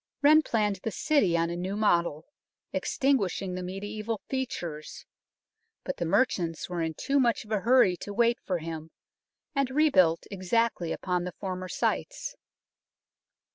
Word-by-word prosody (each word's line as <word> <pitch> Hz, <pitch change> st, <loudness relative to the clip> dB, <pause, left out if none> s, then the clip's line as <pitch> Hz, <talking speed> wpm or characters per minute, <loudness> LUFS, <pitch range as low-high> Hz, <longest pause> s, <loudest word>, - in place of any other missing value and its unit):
Wren 305 Hz, +2 st, +7 dB
planned 210 Hz, -8 st, 0 dB
the 185 Hz, -, -4 dB
City 205 Hz, -, +2 dB
on 170 Hz, 0 st, 0 dB
a -, -, -3 dB
new 185 Hz, +3 st, -3 dB
model, 170 Hz, -7 st, +1 dB, 0.5 s
extinguishing 200 Hz, -8 st, 0 dB
the 185 Hz, -, -4 dB
mediaeval 205 Hz, +4 st, -4 dB
features; 175 Hz, -, -4 dB, 0.8 s
but 275 Hz, -, -4 dB
the 170 Hz, -, -1 dB
merchants 170 Hz, -6 st, +1 dB
were 175 Hz, -1 st, -3 dB
in 160 Hz, -1 st, -2 dB
too 280 Hz, -, +1 dB
much 235 Hz, -4 st, +2 dB
of 215 Hz, -, -14 dB
a 215 Hz, -, +2 dB
hurry 235 Hz, -4 st, +4 dB
to 205 Hz, -, -7 dB
wait 235 Hz, +3 st, +2 dB
for 185 Hz, -, -1 dB
him, 160 Hz, -1 st, -6 dB, 0.6 s
and 275 Hz, -3 st, +1 dB
rebuilt 200 Hz, -, +3 dB
exactly 195 Hz, -2 st, 0 dB
upon 180 Hz, -2 st, -1 dB
the 180 Hz, 0 st, -6 dB
former 185 Hz, -1 st, -4 dB
sites. -, -, -2 dB
195 Hz, 145 wpm, -28 LUFS, 175-235 Hz, 0.8 s, Wren